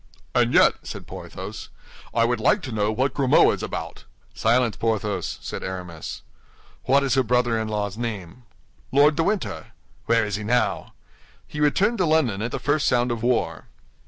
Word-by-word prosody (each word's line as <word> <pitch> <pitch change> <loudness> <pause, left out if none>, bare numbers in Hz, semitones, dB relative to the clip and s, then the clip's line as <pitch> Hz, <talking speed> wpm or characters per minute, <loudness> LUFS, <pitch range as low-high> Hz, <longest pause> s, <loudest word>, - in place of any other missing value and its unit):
"And - - +3
yet," - - +6
said - - -8
Porthos, - - -8 0.4
"I 115 0 +2
would 120 +1 0
like - - +2
to 130 - -5
know 105 -1 0
what 130 +4 0
Grimaud 135 -3 +4
is - - -5
about." - - -6 0.3
"Silence, 115 -1 +2
Porthos!" 110 -3 -2
said - - -5
Aramis. 90 -4 -6 0.6
"What 140 +1 +4
is 135 -3 +1
her 135 - +4
brother 120 -1 +1
in 110 - -2
law's 105 -1 -3
name?" 110 -3 -5 0.5
"Lord 145 +2 +5
de 165 - +1
Winter." 200 +2 -2 0.3
"Where 115 -1 +3
is 105 -1 -2
he 105 - -6
now?" 125 +4 0 0.5
"He 150 - -8
returned 195 +10 +2
to 180 - +2
London 140 -11 +2
at 115 - -2
the - - -2
first 145 0 0
sound 120 0 +2
of 115 -2 -3
war." 120 0 0
120 Hz, 175 wpm, -24 LUFS, 110-140 Hz, 0.6 s, yet